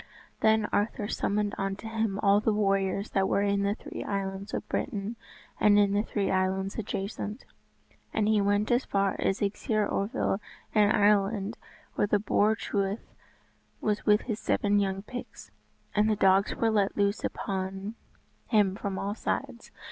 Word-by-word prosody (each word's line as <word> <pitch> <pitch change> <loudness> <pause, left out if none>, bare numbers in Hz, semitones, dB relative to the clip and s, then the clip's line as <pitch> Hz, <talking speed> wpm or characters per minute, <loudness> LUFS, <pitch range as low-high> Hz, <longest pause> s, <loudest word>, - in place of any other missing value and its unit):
Then 220 -1 +3
Arthur 205 0 0
summoned 205 0 -1
unto 195 +2 -3
him 220 -3 -1
all 200 0 +5
the 220 - +1
warriors 195 -1 0
that 190 -1 +1
were 200 - +2
in 200 0 +1
the 200 +1 +1
three - - -7
islands 195 0 -3
of - - -4
Britain 215 -3 -3 0.4
and 205 -1 +5
in 200 -1 +4
the 205 - +3
three 205 -2 -1
islands 190 +1 0
adjacent; 210 +2 -4 0.7
and 210 -1 +1
he 215 -1 +3
went 205 +2 +1
as 240 +2 +3
far 195 -1 0
as 195 - 0
Esgeir 210 +1 0
Oervel 200 -1 -1 0.3
in 210 -2 +5
Ireland 205 0 +2 0.4
where 205 - +1
the 205 - +3
Boar 210 +1 +2
Truith 200 -1 -3 0.7
was 210 -1 -1
with 210 0 +4
his 220 -3 -4
seven 205 0 +2
young 195 -1 -1
pigs. 245 +3 -9 0.4
And 210 +1 +3
the 215 - +3
dogs 195 0 +3
were 225 -1 +1
let 205 -2 +1
loose 200 0 +1
upon 195 +1 -3 0.5
him 205 -5 +3
from 200 -2 -4
all 200 +1 -2
sides. 235 +2 -4
205 Hz, 160 wpm, -28 LUFS, 195-215 Hz, 0.7 s, all